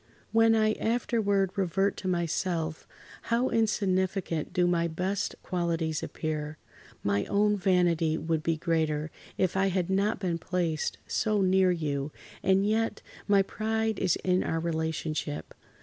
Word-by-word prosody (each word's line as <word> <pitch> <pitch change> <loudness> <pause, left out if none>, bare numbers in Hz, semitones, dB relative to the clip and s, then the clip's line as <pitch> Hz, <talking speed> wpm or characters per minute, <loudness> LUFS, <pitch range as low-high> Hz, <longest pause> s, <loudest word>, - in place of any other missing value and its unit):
"When 225 0 +5
I 215 -1 +3
afterward 215 -4 +1
revert 195 +1 +1
to 185 - -5
myself, 170 -2 -1 0.4
how 235 +2 +2
insignificant 190 -6 0
do 180 -1 +2
my 170 -1 +2
best 185 +4 -2
qualities 165 -3 -1
appear! 155 -1 -4 0.5
My 100 0 +1
own 210 +1 +2
vanity 175 -4 +2
would 160 0 -1
be 165 0 0
greater 155 -2 0 0.3
if 185 -1 +1
I 190 0 +3
had 185 -1 0
not 200 +2 +1
been 175 -4 -1
placed 170 -3 -1
so 210 -2 +1
near 185 0 +4
you, 150 -4 -1 0.3
and 195 0 +3
yet, 225 +1 0 0.2
my 200 -1 +5
pride 220 +1 -1
is 185 -3 +2
in 185 0 +2
our 165 - -1
relationship. 160 - -3
180 Hz, 135 wpm, -28 LUFS, 160-200 Hz, 0.5 s, When